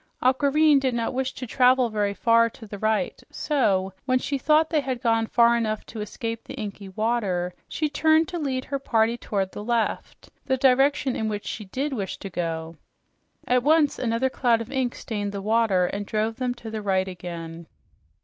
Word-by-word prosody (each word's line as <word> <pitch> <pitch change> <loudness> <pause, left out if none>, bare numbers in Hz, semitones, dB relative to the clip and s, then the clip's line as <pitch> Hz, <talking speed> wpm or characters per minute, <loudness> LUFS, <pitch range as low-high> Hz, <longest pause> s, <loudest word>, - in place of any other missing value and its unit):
Aquareine 285 +3 +4
did 260 -3 0
not 230 -1 -1
wish 260 0 -1
to 255 - -6
travel 250 0 +3
very 205 -1 0
far 230 +1 +4
to 225 - -13
the 205 -1 -8
right, 215 0 0
so 200 -10 0
when 255 -1 +3
she 275 +2 -2
thought 310 +4 +3
they 315 - +3
had 260 -3 -3
gone 225 -1 +1
far 235 0 +4
enough 215 -2 -1
to 220 - -7
escape 225 +2 -5
the - - -9
inky 200 -2 -6
water, 190 -4 -1 0.2
she 310 - -1
turned 315 +2 +3
to 355 -2 -4
lead 265 -4 -2
her 275 - -3
party 230 -3 +1
toward 195 -5 -2
the 205 - -7
left 235 0 -2 0.2
the 265 -1 +2
direction 270 0 +3
in 220 -1 -1
which 205 -1 -4
she 215 - -5
DID 270 +9 -3
wish 200 -6 -4
to 195 - -8
go. 165 -2 -4 0.7
At 250 0 +3
once 300 +2 +3
another 245 +2 0
cloud 240 -4 +2
of 230 - -7
ink 260 -3 -1
stained 205 -2 -4
the 200 - -3
water 215 -4 +2
and 200 +3 -3
drove 215 +2 -2
them 250 -1 -1
to 230 -2 -9
the 220 -1 -4
right 190 -2 +1
again. 170 -2 -7
230 Hz, 195 wpm, -25 LUFS, 205-260 Hz, 0.7 s, Aquareine